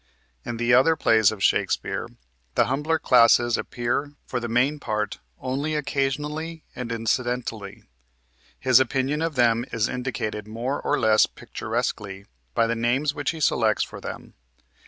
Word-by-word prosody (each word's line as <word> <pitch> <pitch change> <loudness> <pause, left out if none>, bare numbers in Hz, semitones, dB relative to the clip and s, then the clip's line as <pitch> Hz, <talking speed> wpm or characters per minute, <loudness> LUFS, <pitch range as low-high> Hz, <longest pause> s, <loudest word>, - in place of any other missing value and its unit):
In 115 - -5
the 120 +1 +2
other 135 +6 +5
plays 110 -7 +4
of 100 -3 -6
Shakespeare - - 0 0.5
the - - +4
humbler 150 +5 0
classes 120 -2 +5
appear 125 +4 -2
for 125 - -3
the 120 - -4
main 130 +6 +1
part 105 -4 -3 0.2
only 140 +4 -2
occasionally 150 +3 -2
and 125 -2 -5
incidentally. 115 -2 -2 0.8
His 130 -1 +5
opinion 130 +3 0
of 165 -2 -1
them 120 -2 +3
is 115 -2 0
indicated 110 -4 -4
more 120 +6 -3
or - - 0
less 110 -1 +4
picturesquely 100 -1 -4 0.3
by 115 - +4
the 115 +1 0
names 125 +6 +1
which 145 0 -2
he 160 - -3
selects 150 - +2
for - - -9
them. - - -8
125 Hz, 145 wpm, -24 LUFS, 115-145 Hz, 0.8 s, other